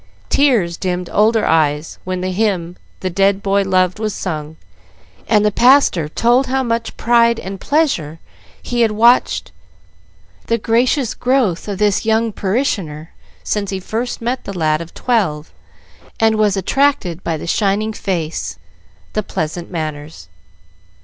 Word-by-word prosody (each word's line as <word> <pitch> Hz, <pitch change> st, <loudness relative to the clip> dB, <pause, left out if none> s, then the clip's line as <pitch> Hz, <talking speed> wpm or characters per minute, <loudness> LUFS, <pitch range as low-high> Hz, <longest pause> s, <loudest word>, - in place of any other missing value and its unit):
Tears 225 Hz, -12 st, +2 dB
dimmed 180 Hz, -1 st, -3 dB
older 220 Hz, +1 st, +3 dB
eyes 155 Hz, -1 st, +1 dB
when 185 Hz, 0 st, -3 dB
the 185 Hz, 0 st, -2 dB
hymn 185 Hz, -4 st, -1 dB, 0.3 s
the 185 Hz, -, -1 dB
dead 195 Hz, +2 st, +2 dB
boy 200 Hz, 0 st, +2 dB
loved 185 Hz, 0 st, +1 dB
was 215 Hz, -2 st, -2 dB
sung, 155 Hz, -3 st, -5 dB, 0.7 s
and 210 Hz, -2 st, +3 dB
the 210 Hz, -, +3 dB
pastor 240 Hz, -, +4 dB
told 240 Hz, -, +2 dB
with -, -, -6 dB
how 265 Hz, 0 st, +1 dB
much 230 Hz, -1 st, -2 dB
pride 235 Hz, -1 st, +3 dB
and 190 Hz, 0 st, -7 dB
pleasure 270 Hz, -, 0 dB, 0.5 s
he 240 Hz, -1 st, -1 dB
had 230 Hz, -, +4 dB
watched 235 Hz, +3 st, +3 dB, 1.0 s
the 230 Hz, -, +1 dB
gracious 240 Hz, +3 st, +1 dB
growth 245 Hz, -9 st, 0 dB
of 200 Hz, -2 st, -3 dB
this 205 Hz, -1 st, +1 dB
young 225 Hz, 0 st, +1 dB
parishioner 190 Hz, -, -2 dB, 0.3 s
since 205 Hz, -2 st, -2 dB
he 190 Hz, -1 st, -3 dB
first 230 Hz, +5 st, -4 dB
met 250 Hz, +2 st, -2 dB
the 195 Hz, -2 st, -6 dB
lad 155 Hz, -1 st, +1 dB
of 170 Hz, -, -10 dB
twelve 185 Hz, -11 st, -1 dB, 0.7 s
and 220 Hz, 0 st, +3 dB
was 210 Hz, -2 st, +2 dB
attracted 195 Hz, -, 0 dB
by 165 Hz, -1 st, -1 dB
the -, -, -7 dB
shining 205 Hz, +4 st, 0 dB
face, 170 Hz, -6 st, -3 dB, 0.6 s
the 215 Hz, -, 0 dB
pleasant 170 Hz, -3 st, -4 dB
manners. 155 Hz, -, -6 dB
200 Hz, 145 wpm, -17 LUFS, 170-230 Hz, 1.0 s, pastor